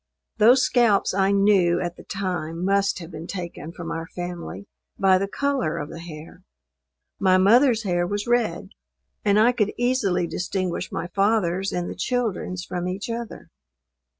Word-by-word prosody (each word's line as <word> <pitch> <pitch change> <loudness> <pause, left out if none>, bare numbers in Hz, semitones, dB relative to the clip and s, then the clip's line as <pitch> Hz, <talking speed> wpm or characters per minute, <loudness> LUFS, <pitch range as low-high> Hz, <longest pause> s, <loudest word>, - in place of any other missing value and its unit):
Those 245 +4 +6
scalps 235 -7 +3
I 195 0 +2
knew 195 -4 +3
at 175 -1 -3
the - - -13
time 180 -3 -3
must 200 0 +2
have 170 -1 -9
been 160 +1 -8
taken 175 -4 -6
from 170 -1 -7
our 165 0 -4
family 175 +2 -6 0.3
by 190 -1 +4
the 195 - -1
color 270 - -1
of 145 - -5
the 165 - -8
hair. 165 +1 -10 0.8
My 185 -1 +4
mother's 230 +4 +4
hair 175 -3 0
was 205 +2 -2
red; 235 -8 0 0.5
and 205 0 +3
I 230 +3 +5
could 210 -4 0
easily 245 -8 +1
distinguish 185 0 -3
my 165 - -3
father's 195 -1 +1
and 175 0 -2
the - - -5
children's 210 -7 -2
from 180 0 -4
each 195 +5 -4
other. 230 -1 -7
190 Hz, 160 wpm, -24 LUFS, 175-215 Hz, 0.8 s, Those